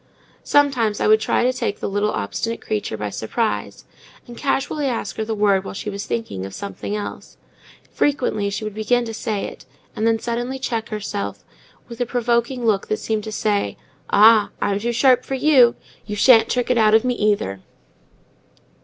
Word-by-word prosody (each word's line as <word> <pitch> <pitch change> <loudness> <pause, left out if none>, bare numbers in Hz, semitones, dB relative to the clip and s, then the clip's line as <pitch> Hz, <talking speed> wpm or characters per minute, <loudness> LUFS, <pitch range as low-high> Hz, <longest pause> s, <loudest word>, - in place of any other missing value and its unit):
Sometimes 255 -7 +2
I - - 0
would 215 0 +5
try 220 - +1
to 255 +1 +2
take 230 -5 -3
the - - -3
little 205 +1 0
obstinate 160 - -3
creature 210 - -3
by 105 -1 -4
surprise, 160 - -3 0.4
and 240 - -11
casually 280 +2 -1
ask 225 -7 -3
her 220 - -1
the 220 0 -3
word 200 -2 +2
while 195 - -7
she 210 - -4
was 200 0 -6
thinking 225 - -3
of 95 0 -7
something 200 +1 -5
else; 210 - -7 0.5
frequently 245 -8 0
she 200 - -4
would 215 -1 -4
begin 235 +3 +1
to 225 - -6
say 215 -2 -3
it, - - -10 0.3
and 220 - 0
then 225 0 +3
suddenly 240 +3 -3
check 230 -4 -3
herself, 205 -2 -5 0.4
with 235 0 -8
a 245 - 0
provoking 240 0 0
look 210 -3 +1
that 215 - -1
seemed 220 -1 -2
to 215 - -5
say, 210 -1 -1 0.3
"Ah! 215 0 +6
I'm 200 0 0
too 235 +3 -1
sharp 250 +1 +4
for 270 - -3
you; 260 -4 +5 0.3
you 210 - -4
shan't 225 +2 +6
trick 250 0 0
it 245 - +2
out 215 -1 +5
of 220 - +4
me, 250 - +1
either." 205 - 0
220 Hz, 190 wpm, -21 LUFS, 205-240 Hz, 0.5 s, Ah